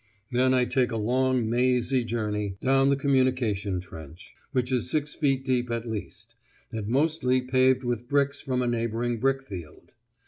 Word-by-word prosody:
Then 130 +1 +3
I 125 -1 +3
take 125 0 +1
a 115 - -2
long 125 +2 +1
mazy 125 +2 +2
journey 105 -4 -3
down 135 +1 +3
the 140 - +4
communication 130 -8 +1
trench, 80 -1 -11 0.2
which 125 -2 0
is 125 -3 0
six 150 -1 -1
feet 135 -3 0
deep 125 -2 0
at 115 0 -3
least, 110 +1 -7 0.4
and 110 -3 -4
mostly 135 0 +2
paved 130 0 +2
with 120 -1 -3
bricks 140 0 +1
from 125 -3 -1
a - - -1
neighbouring 115 0 -1
brick 135 +2 +1
field. 90 - -10
125 Hz, 165 wpm, -26 LUFS, 115-130 Hz, 0.4 s, the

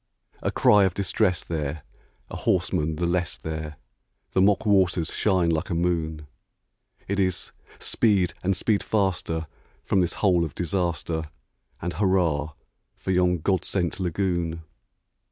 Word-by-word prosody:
A - - 0
cry 105 -1 +5
of 95 - -1
distress 95 -1 +1
there! 75 -2 -3 0.5
a - - -5
horseman 80 +1 0
the 85 - -1
less 85 -1 0
there! 80 -2 -5 0.5
The 95 - +2
mock 105 +2 +3
waters 95 -5 +2
shine 90 -5 +2
like 80 -1 -1
a 85 - -1
moon! 80 -3 -1 0.8
It 100 +1 -1
is 95 -2 0 0.3
"Speed, 100 -6 +2
and 95 +1 0
speed 105 -3 +1
faster 90 -5 0 0.4
from 95 - +2
this 90 - 0
hole 90 -4 +3
of 80 -5 -5
disaster! 85 -2 -1 0.6
And 90 +1 -2
hurrah 85 -7 +1 0.4
for 95 - -4
yon 90 -2 +2
God 95 0 +1
sent 90 -2 -1
lagoon!" 85 -2 -1
90 Hz, 135 wpm, -25 LUFS, 80-95 Hz, 0.8 s, cry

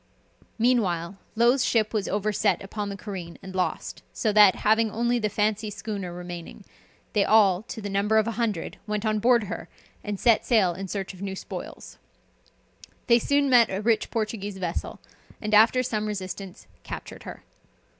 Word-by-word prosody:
Meanwhile, 195 -7 +1 0.2
Low's 240 +4 +4
ship 220 -2 +1
was 210 -3 -1
overset 205 0 0
upon 205 +1 -4
the 200 - -6
careen 185 -4 -7
and 190 0 -8
lost, 185 -1 -2
so 215 -3 -1
that, 205 -2 +7
having 220 +1 +4
only 240 +3 0
the 215 -2 0
Fancy 210 +1 0
schooner 200 -2 -5
remaining, 175 +2 -8 0.5
they 205 - +3
all, 200 -4 +4
to 225 - -6
the - - -3
number 200 +2 +1
of 215 - +4
a 230 - -1
hundred, 220 -6 -2
went 210 +1 -2
on 215 0 +1
board 235 +1 +4
her, 205 - -6 0.3
and 205 -2 -4
set 230 -2 +4
sail 205 -8 +3
in 190 +3 -6
search 195 0 -4
of 185 - -13
new 195 -1 -4
spoils. - - -8 1.1
They 235 0 +5
soon 285 +4 +2
met 245 -4 +5
a 190 - -2
rich 225 0 +1
Portuguese 210 -3 -3
vessel, 180 -3 -4 0.4
and 215 0 -4
after 225 +4 +6
some 215 -4 -2
resistance 190 - -6 0.2
captured - - -8
her. - - -10
210 Hz, 170 wpm, -26 LUFS, 195-225 Hz, 1.1 s, that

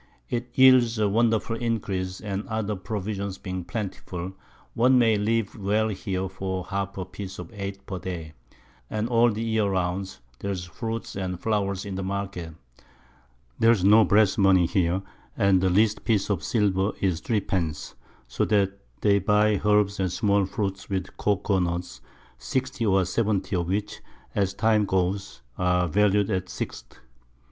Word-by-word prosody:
It 120 0 -2
yields 130 -3 +6
a 105 -1 +2
wonderful 115 +1 +1
Increase, 100 -6 -2
and 100 -1 -4
other 110 -1 -2
Provisions 100 0 -4
being 95 -1 -5
plentiful, 95 -2 -5 0.4
one 125 +3 +4
may 115 -3 +4
live 105 +1 0
well 105 +1 +1
here 95 -2 -3
for 95 -1 -4
half 100 0 -3
a 95 - -3
Piece 95 +1 -8
of - - -8
Eight 100 -1 -6
per 95 -2 -5
Day, 85 -4 -6 0.6
and 110 +1 -1
all 120 0 +4
the 110 +2 -3
Year 110 -3 +1
round 95 0 -2 0.2
there's 100 -2 -3
Fruit 115 +6 -5
and 90 -2 -3
Flowers 100 -3 -1
in 100 - -5
the 95 - -3
Market. 95 -4 -4 1.0
There's 115 -4 +4
no 105 +3 +7
Brass 105 -1 +3
Money 95 -3 +5
here, 90 +1 +1 0.3
and 100 -4 +4
the 95 - +3
least 105 +3 +2
Piece 105 -3 +1
of 95 -3 -1
Silver 100 -2 +1
is 90 -4 0
Three 110 +4 0
pence; 85 -7 -3 0.3
so - - -1
that 100 -2 +1 0.2
they 100 -1 +4
buy 105 +1 +2
Herbs 105 -1 +3
and 95 -2 0
small 100 -1 +2
Fruit 95 -1 -3
with 95 -2 -3
Cocoa 100 -1 +1
Nuts, 85 -7 -3 0.4
60 130 - -2
or 95 -2 +3
70 100 -1 0
of 85 -2 -1
which, 100 +3 -2 0.3
as 95 -1 0
the - - -17
Time 110 -1 +4
goes, 95 -7 -1 0.2
are 90 -1 +2
valu'd 105 +3 +2
at 95 -2 -1
6_d. - - -6
100 Hz, 160 wpm, -26 LUFS, 95-110 Hz, 1.0 s, no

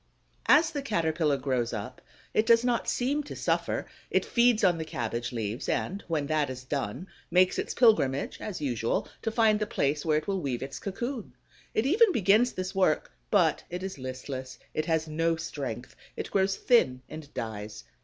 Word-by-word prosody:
As 315 +2 +6
the 290 - -3
Caterpillar 160 - +1
grows 130 -3 -1
up, 110 +4 -6 0.3
it 215 - +2
does 230 0 +6
not 245 -1 0
seem 275 +4 0
to 290 - -8
suffer; - - 0 0.2
it - - +1
feeds 235 -2 +3
on 175 -3 +4
the - - -1
cabbage 120 -6 -3
leaves 115 +1 -3
and, 195 +2 -1
when 155 -4 0
that 150 -1 +1
is 130 -1 -6
done, 135 - -3 0.2
makes 180 +1 +4
its - - -3
pilgrimage 145 - +3
as 205 -4 -5
usual 120 -5 -1
to 225 - -1
find 220 -1 +3
the 210 - -1
place 145 -5 0
where 155 -2 +2
it 155 - -3
will 195 -2 -1
weave 130 -5 -2
its 135 0 -6
cocoon. 235 +4 -4 0.4
It 220 - +2
even 400 - +5
begins 215 - +3
this 185 +1 -4
work; 185 -6 +2 0.2
but - - +3
it 180 +1 -5
is 190 -6 -5
listless, 130 0 -6 0.2
it 155 - -1
has 160 -1 +1
no 165 +2 +1
strength; 135 -7 -5 0.2
it - - -5
grows 195 0 +2
thin 130 - +3
and 155 -2 -9
dies. 105 -1 -5
160 Hz, 185 wpm, -28 LUFS, 130-215 Hz, 0.4 s, As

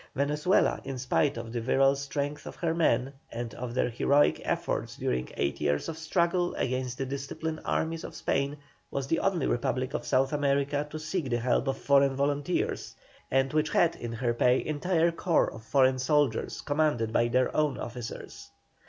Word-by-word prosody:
Venezuela, 150 +6 +2 0.2
spite 135 +3 +1
of 115 0 -6
the 120 - -2
virile 135 +3 +3
strength 145 +1 -4
of - - -7
her 165 -2 -1
men, 140 -5 +1 0.2
and 115 0 -5
of 120 -1 -6
their - - +2
heroic 140 +5 +3
efforts - - -2
during 60 0 -1
eight 70 0 -1
years 75 0 0
of 165 - -4
struggle 170 +2 0
against 130 -1 -2
the 135 - -2
disciplined 140 +4 -4
armies 165 0 -1
of - - -8
Spain, 140 +1 -1 0.3
was 140 -1 -3
the 165 +4 +1
only 185 -6 +1
Republic 130 +2 -1
of - - -2
South 135 +2 +1
America 145 0 +1
to 155 - -6
seek 155 -1 -3
the 120 - +1
help 125 +3 +1
of 135 - 0
foreign 140 -1 +3
volunteers, 145 +5 -1 0.3
and 135 +2 +1
which 155 0 +2
had 170 -1 +3
in 120 -1 -6
her 120 0 0
pay 125 +2 +3
entire 165 +2 +1
corps 170 0 +1
of 110 - -9
foreign 130 +1 +3
soldiers 135 -3 +1
commanded 145 -7 0
by 120 - +3
their 125 +2 +1
own 150 -2 +1
officers. 120 0 -7
140 Hz, 175 wpm, -29 LUFS, 125-155 Hz, 0.3 s, virile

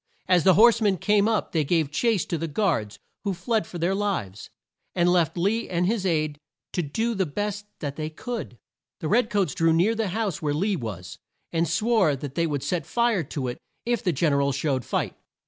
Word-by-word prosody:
As 180 -3 +4
the 190 -2 +6
horse 230 +2 +6
men 200 -3 +2
came 210 +2 +3
up 220 -2 0
they 160 -2 +1
gave 155 -1 +1
chase 220 +3 +1
to 170 - -2
the 165 - -2
guards 145 - 0 0.3
who 200 -3 -1
fled 220 -2 -1
for 175 - -7
their 170 +3 +1
lives, 195 - -2 0.5
and 175 -1 +3
left 175 -2 +2
Lee 205 +6 0
and 180 0 +1
his 200 -1 0
aide 155 -3 0 0.3
to 180 - 0
do 220 +10 -1
the 190 -4 0
best 205 +6 -3
that 140 -2 -4
they 155 0 -3
could. 215 - -6 0.4
The 155 - -3
red 220 +5 +3
coats 195 -9 +1
drew 165 0 +2
near 175 +7 +3
the 225 -2 -1
house 200 -2 -2
where 145 -2 0
Lee 195 +6 +1
was, 95 - -6 0.3
and 165 0 +1
swore 200 -3 +2
that 135 0 -7
they 170 +2 +1
would 145 -3 -2
set 160 +1 -2
fire 235 -5 +2
to 130 -1 -4
it 120 - -5 0.3
if 240 -1 0
the 180 - +2
Gen 155 0 +1
er 140 - +3
al 140 0 +2
showed 135 -1 -1
fight. - - -2
175 Hz, 215 wpm, -25 LUFS, 150-210 Hz, 0.5 s, the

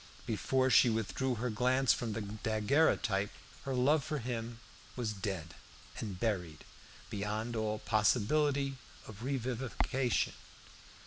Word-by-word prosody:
Before 130 0 +1
she 125 - +7
withdrew 115 +4 -1
her 120 +1 -2
glance 125 +3 +3
from 115 -3 -3
the 110 - -3
daguerreotype, 110 0 +1 0.4
her 135 -1 -1
love 140 +4 +3
for 150 - -2
him 120 -2 -4 0.4
was 115 -4 -2
dead 95 -5 -4 0.5
and 100 -5 -5
buried 90 -8 -2 0.5
beyond 105 +3 -2
all 110 -1 0
possibility 135 +7 +2 0.3
of 110 -1 -10
revivification. 130 -2 0
115 Hz, 115 wpm, -33 LUFS, 105-130 Hz, 0.5 s, she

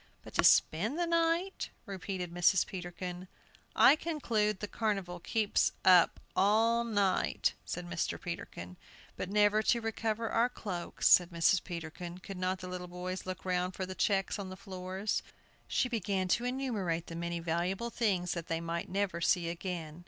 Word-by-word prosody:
"But - - -12
to - - +2
spend 215 - +4
the 345 - +1
night," 335 +3 0 0.2
repeated 185 -3 -5
Mrs. 175 +1 +4
Peterkin. 180 0 -6 0.5
"I - - +8
conclude 230 - -1
the 210 - -4
Carnival 195 -6 -2
keeps 215 +3 +1
up 180 -2 +6 0.2
all 225 +4 +3
night," 205 -5 +1
said 175 0 -5
Mr. 175 -1 -2
Peterkin. 90 - -7 0.4
"But 185 - -4
never 210 +1 +4
to 235 +2 +2
recover 225 0 -2
our 235 +2 +3
cloaks," 185 -8 -3
said 175 -1 +7
Mrs. 170 +2 +3
Peterkin; 170 0 -6
"could 185 +1 -8
not 185 0 -1
the 185 - -6
little 180 0 -5
boys 180 +1 -5
look 185 0 -5
round 180 0 0
for 190 - -3
the 185 - -6
checks 195 +1 0
on 195 -2 -5
the 185 - -8
floors?" 190 +1 -3 0.5
She - - +1
began 200 -5 -1
to 235 +6 +2
enumerate 220 -11 -1
the 165 - -8
many 170 0 -3
valuable 175 +7 -1
things 190 -7 0
that 170 -2 -4
they 165 0 -1
might 170 0 -4
never 190 -3 -1
see 170 -1 +2
again. 170 -2 -5
185 Hz, 165 wpm, -32 LUFS, 175-215 Hz, 0.5 s, I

